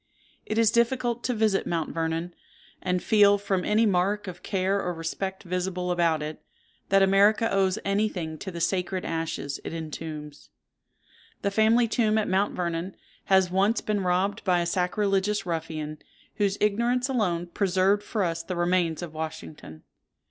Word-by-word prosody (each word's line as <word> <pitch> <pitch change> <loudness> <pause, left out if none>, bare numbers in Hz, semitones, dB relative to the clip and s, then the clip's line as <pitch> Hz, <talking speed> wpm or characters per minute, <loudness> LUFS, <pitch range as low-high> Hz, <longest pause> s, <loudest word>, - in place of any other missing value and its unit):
It 215 - -2
is 225 -1 +4
difficult 240 0 +1
to 250 - +1
visit 215 -3 +1
Mount 165 -2 -2
Vernon, 165 +1 -2 0.5
and 180 -1 -1
feel, 205 -2 +5
from 195 -2 -1
any 215 +2 +3
mark 200 +1 +1
of 180 -1 -7
care 195 0 0
or 180 -1 -3
respect 190 +4 -4
visible 180 0 -2
about 165 -3 +1
it, 155 +1 -6 0.5
that 195 0 +5
America 205 +3 +4
owes 190 -1 +2
any 205 +2 +1
thing 160 -5 -5
to 195 - -6
the 170 -2 -6
sacred 185 +1 -1
ashes 160 -4 -3
it - - -5
entombs. 155 -2 -7 0.9
The 200 - +1
family 225 +3 +4
tomb 220 -1 +1
at 215 - +1
Mount 195 +2 +1
Vernon 175 +1 -3 0.3
has 190 -2 +3
once 200 +5 +2
been 210 -2 -1
robbed 185 +2 0
by 180 -3 +2
a - - -1
sacrilegious 195 +3 0
ruffian, 155 -3 -4 0.4
whose 200 -2 +1
ignorance 235 +5 +1
alone 190 -10 0
preserved 190 +2 +1
for 205 0 -2
us 165 -2 -1
the 180 +2 -5
remains 175 -2 +1
of 165 -3 -7
Washington. 155 - -7
190 Hz, 160 wpm, -26 LUFS, 170-205 Hz, 0.9 s, feel